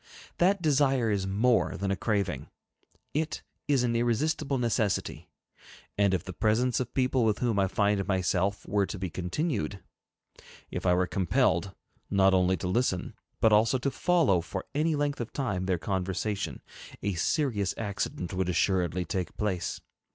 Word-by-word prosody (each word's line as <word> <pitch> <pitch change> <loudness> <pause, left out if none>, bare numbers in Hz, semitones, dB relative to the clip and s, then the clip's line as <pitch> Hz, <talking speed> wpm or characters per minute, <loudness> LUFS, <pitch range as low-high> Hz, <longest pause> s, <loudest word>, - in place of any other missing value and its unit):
That 185 +1 +3
desire 135 -6 +3
is 95 -2 0
more 110 +5 +2
than 100 0 -1
a - - +1
craving; 100 -2 -1 0.7
it 155 +1 -2 0.2
is 140 -4 +3
an 120 -1 +1
irresistible 135 +5 0
necessity. 100 -9 -1 0.7
And 100 -1 +3
if 90 - -3
the 95 - -7
presence 115 +4 +1
of 125 -2 -3
people 130 -1 +2
with 110 -2 +2
whom 115 -5 0
I 95 - +3
find 100 0 +1
myself 95 +1 0
were 100 -1 +1
to - - -5
be 95 -2 -4
continued; 100 - -2 0.9
if - - -3
I 90 - +5
were 90 +1 +2
compelled, 90 -1 +1 0.3
not 95 -1 +4
only 95 0 +3
to 90 - -4
listen, 95 -2 0 0.3
but 110 -1 +4
also 110 +5 +4
to 135 +2 -1
follow, 155 - +2
for 95 +2 -5
any 155 +2 +1
length 145 -2 -1
of 115 - -5
time, 105 -9 -2
their 95 -2 +1
conversation, 95 - -2 0.4
a 100 0 0
serious 105 - 0
accident 100 -4 -3
would 90 -1 -1
assuredly 90 -1 +1
take 90 +1 -3
place. 95 -5 -2
100 Hz, 160 wpm, -28 LUFS, 95-125 Hz, 0.9 s, I